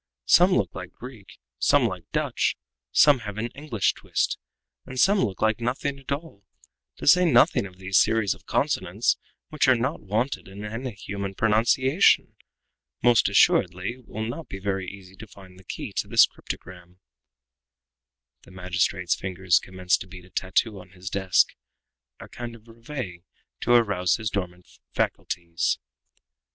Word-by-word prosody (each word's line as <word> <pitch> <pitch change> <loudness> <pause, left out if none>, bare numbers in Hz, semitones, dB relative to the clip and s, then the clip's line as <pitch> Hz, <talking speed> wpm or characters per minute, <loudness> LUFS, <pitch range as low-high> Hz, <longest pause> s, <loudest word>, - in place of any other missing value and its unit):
Some 180 +2 +6
look - - +1
like - - -8
Greek, 125 -6 -12 0.2
some - - +4
like - - -4
Dutch; - - 0 0.3
some 145 -3 +6
have 105 -3 -7
an 115 +2 -2
English 130 -7 -1
twist, - - -2 0.4
and 130 0 -7
some 200 +6 +4
look 100 0 -2
like 110 0 +2
nothing 135 +3 -2
at 135 - -10
all! 140 -8 -5 0.5
To - - -7
say 180 +6 +7
nothing 120 - +4
of 90 -1 -17
these 95 +1 +2
series 110 -3 +2
of - - -19
consonants 105 -6 0 0.3
which 155 -3 +1
are 130 - +6
not 130 +6 -2
wanted 110 +7 -2
in 100 +2 -8
any 115 +3 -5
human 100 0 -5
pronunciation. 120 - +3 0.7
Most 120 -4 +5
assuredly 95 0 +3
it 125 -2 -19
will 110 - -5
not 125 +8 -6
be 95 - -7
very 95 -2 -3
easy 95 -2 -13
to 110 - -10
find 95 -2 -15
the - - -17
key - - -7
to - - -1
this - - +6
cryptogram." 90 0 -10 1.4
The - - -19
magistrate's 90 0 -1
fingers 95 -2 +1
commenced 95 -1 -1
to 90 - -8
beat 90 -1 -12
a 90 - -20
tattoo 100 +2 0
on 90 0 -15
his 95 +1 -8
desk 95 -2 +3 0.7
a - - -10
kind 120 -1 -8
of 115 0 -18
reveille 115 -5 -7 0.4
to 120 - +2
arouse 100 -6 +3
his 110 -3 -3
dormant 90 -2 -4 0.3
faculties. 85 -1 -1
105 Hz, 160 wpm, -25 LUFS, 95-120 Hz, 1.4 s, say